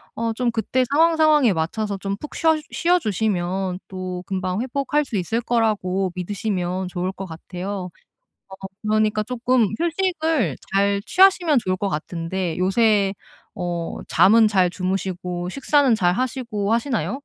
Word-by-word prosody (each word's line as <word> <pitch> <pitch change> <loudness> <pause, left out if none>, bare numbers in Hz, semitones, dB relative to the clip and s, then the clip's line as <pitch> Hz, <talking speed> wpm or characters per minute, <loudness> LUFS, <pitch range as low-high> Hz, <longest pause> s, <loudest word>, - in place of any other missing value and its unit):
어 230 0 -1
좀 240 +1 0
그때 240 +3 0
상황, 325 +3 +4
상황에 305 -6 +5
맞춰서 200 +6 -2
좀 195 +1 -3
푹 300 - -9
쉬어 320 -1 +3 0.2
쉬어 350 +1 +2
주시면 190 - -1
또 185 -1 -5
금방 185 +1 -2
회복할 280 +4 0
수 230 - -3
있을 195 +6 -1
거라고 205 -6 0
믿으시면 185 -1 -2
좋을 180 0 -2
것 195 0 -7
같아요. 180 +3 -6 0.6
어 190 - -9 0.3
그러니까 215 0 +1
조금 250 0 +1
휴식을 325 - 0 0.2
잘 200 0 +2
취하시면 360 -7 +4
좋을 185 0 -1
것 200 - -1
같은데 165 +1 -3
요새 200 +1 +2 0.4
어 175 -1 -4
잠은 220 +3 +5
잘 190 -4 +3
주무시고 185 -1 -3
식사는 275 +1 +2
잘 180 -4 +2
하시고 235 -5 -2
하시나요? 250 +2 -1
205 Hz, 295 characters per minute, -22 LUFS, 185-250 Hz, 0.6 s, 상황에